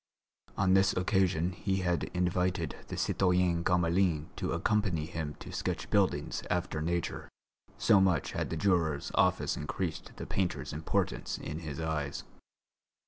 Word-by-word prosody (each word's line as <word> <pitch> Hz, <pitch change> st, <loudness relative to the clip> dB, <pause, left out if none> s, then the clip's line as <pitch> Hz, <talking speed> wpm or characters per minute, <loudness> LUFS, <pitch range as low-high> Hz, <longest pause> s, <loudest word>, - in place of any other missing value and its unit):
On 95 Hz, 0 st, +3 dB
this 95 Hz, 0 st, +5 dB
occasion 90 Hz, -2 st, +2 dB
he 95 Hz, +1 st, -1 dB
had 90 Hz, -2 st, 0 dB
invited 90 Hz, -3 st, 0 dB
the -, -, -5 dB
citoyen 90 Hz, -2 st, +2 dB
Gamelin 85 Hz, -3 st, +2 dB
to -, -, -2 dB
accompany 105 Hz, -8 st, +1 dB
him 80 Hz, -3 st, -4 dB
to -, -, -10 dB
sketch -, -, -3 dB
buildings 80 Hz, -7 st, +1 dB
after 90 Hz, -3 st, -1 dB
nature, 85 Hz, +1 st, -2 dB, 0.5 s
so 100 Hz, -, +5 dB
much 95 Hz, -2 st, +2 dB
had -, -, -2 dB
the 80 Hz, -, -3 dB
juror's 80 Hz, -6 st, +1 dB
office -, -, +2 dB
increased 80 Hz, +2 st, -4 dB
the -, -, -6 dB
painter's 95 Hz, -2 st, -2 dB
importance 75 Hz, +2 st, -1 dB
in 75 Hz, +1 st, -5 dB
his 75 Hz, -3 st, -6 dB
eyes. 80 Hz, -3 st, -2 dB
85 Hz, 140 wpm, -31 LUFS, 80-95 Hz, 0.5 s, this